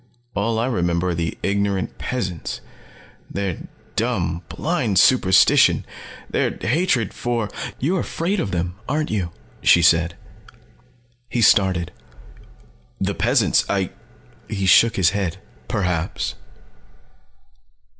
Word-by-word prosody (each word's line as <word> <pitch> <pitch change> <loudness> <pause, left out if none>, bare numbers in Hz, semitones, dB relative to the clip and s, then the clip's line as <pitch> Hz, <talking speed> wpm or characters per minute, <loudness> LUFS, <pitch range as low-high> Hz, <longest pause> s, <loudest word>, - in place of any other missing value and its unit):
All 110 +2 0
I 115 - +1
remember 90 -7 0
are - - 0
the 80 -2 -3
ignorant 100 -1 -1
peasants. 95 - -3 0.7
Their 100 -3 -4 0.3
dumb, 90 -8 -1
blind 120 - -1
superstition 95 -2 +5 0.4
their - - -1
hatred 130 - +1
for 120 -3 -2
" - - -8
"You're 175 +8 0
afraid 185 +6 -2
of 100 - -1
them, 90 +1 -3
aren't 150 +2 -1
you?" 95 -5 -1 0.3
she 85 - +5
said. 85 0 +4 1.1
He 120 - 0
started. 95 -5 +3 1.1
"The - - -1
peasants. - - +2
I 95 -2 0 0.3
" 120 -1 -29
He 100 -3 -2
shook 115 +6 +5
his 90 -4 +3
head. 95 -5 -2 0.3
"Perhaps." 90 -3 -1
100 Hz, 115 wpm, -21 LUFS, 90-120 Hz, 1.1 s, superstition